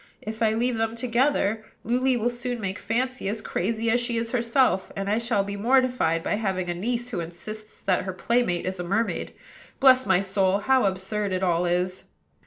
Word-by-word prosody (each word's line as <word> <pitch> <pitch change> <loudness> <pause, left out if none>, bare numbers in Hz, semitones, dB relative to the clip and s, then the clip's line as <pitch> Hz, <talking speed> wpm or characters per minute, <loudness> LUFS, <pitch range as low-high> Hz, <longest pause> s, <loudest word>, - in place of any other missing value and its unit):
If 220 +1 -6
I 220 -1 +3
leave 240 +1 0
them 225 0 -1
together, 235 -3 +1 0.2
Luly 250 +3 +2
will 240 +1 0
soon 240 0 -4
make 195 -2 -4
Fancy 250 -1 -2
as 215 +2 -3
crazy 225 +4 -1
as 245 - +3
she 240 -1 -1
is 230 0 -2
herself, 235 -4 +2
and 195 0 -3
I 210 +3 +2
shall 230 -4 +1
be 200 0 -5
mortified 245 -7 +2
by 205 - 0
having 190 -4 -1
a - - 0
niece 235 +7 -2
who 230 - -3
insists 215 +6 -8
that 185 -2 +1
her 190 - -2
playmate 210 -3 0
is 185 0 -3
a - - -2
mermaid. 200 +6 -1 0.5
Bless 260 -1 +6
my - - +4
soul! 195 0 +1
how 260 +2 +3
absurd 195 +1 -1
it 185 +1 -1
all 175 -1 +2
is!" 180 +1 -1
220 Hz, 195 wpm, -25 LUFS, 190-240 Hz, 0.5 s, Bless